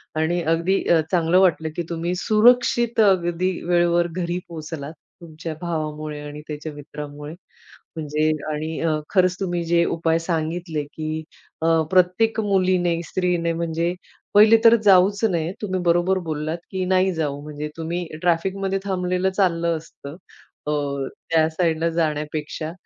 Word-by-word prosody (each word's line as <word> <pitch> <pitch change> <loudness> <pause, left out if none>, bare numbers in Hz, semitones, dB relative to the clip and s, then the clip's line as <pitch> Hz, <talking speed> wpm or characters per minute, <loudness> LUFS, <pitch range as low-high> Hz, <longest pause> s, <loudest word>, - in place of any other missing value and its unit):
आणि 160 +3 0
अगदी 170 +4 +1
अ, 170 -2 +5
चांगलं 175 0 +3
वाटलं, 170 -4 +2
की 175 - -2
तुम्ही 170 +1 -2
सुरक्षित 235 +2 +3
अगदी 185 -3 +3
वेळेवर 175 0 +2
घरी 175 +1 -3
पोहोचलात 155 -2 -7 0.3
तुमच्या 160 -1 -7
भावामुळे 155 -3 -4
आणि 150 0 -8
त्याच्या 155 +1 -6
मित्रामुळे 145 0 -8 0.6
म्हणजे 155 0 0 0.2
आणि 155 +1 -3 0.3
खरंच 185 -2 +3
तुम्ही 175 -3 -2
जे 170 0 +3
उपाय 165 0 0
सांगितले, 165 -1 -2
की 155 +2 -5 0.4
अ, 165 0 +3
प्रत्येक 185 +5 +3
मुलीने 185 -4 +1
स्त्रीने 175 -2 0
म्हणजे 165 +1 -1 0.4
पहिले 215 +2 +7
तर 230 0 +9
जाऊच 200 +1 +5
नये. 170 -5 0
तुम्ही 190 -3 -2
बरोबर 175 +2 +2
बोललात, 155 +1 -3
की 190 -1 -2
नाही 185 0 +2
जाऊ 145 -4 -2
म्हणजे 150 0 -6
तुम्ही 170 +2 -3 0.2
ट्रॅफिकमध्ये 190 +3 0
थांबलेलं 185 -1 0
चाललं 170 -4 +1
असतं, 155 -2 -11 0.5
अ, - - +1 0.6
त्या 160 -1 +4
साइडला 165 0 0
जाण्यापेक्षा. 155 -1 -2
170 Hz, 130 wpm, -22 LUFS, 160-185 Hz, 0.6 s, तर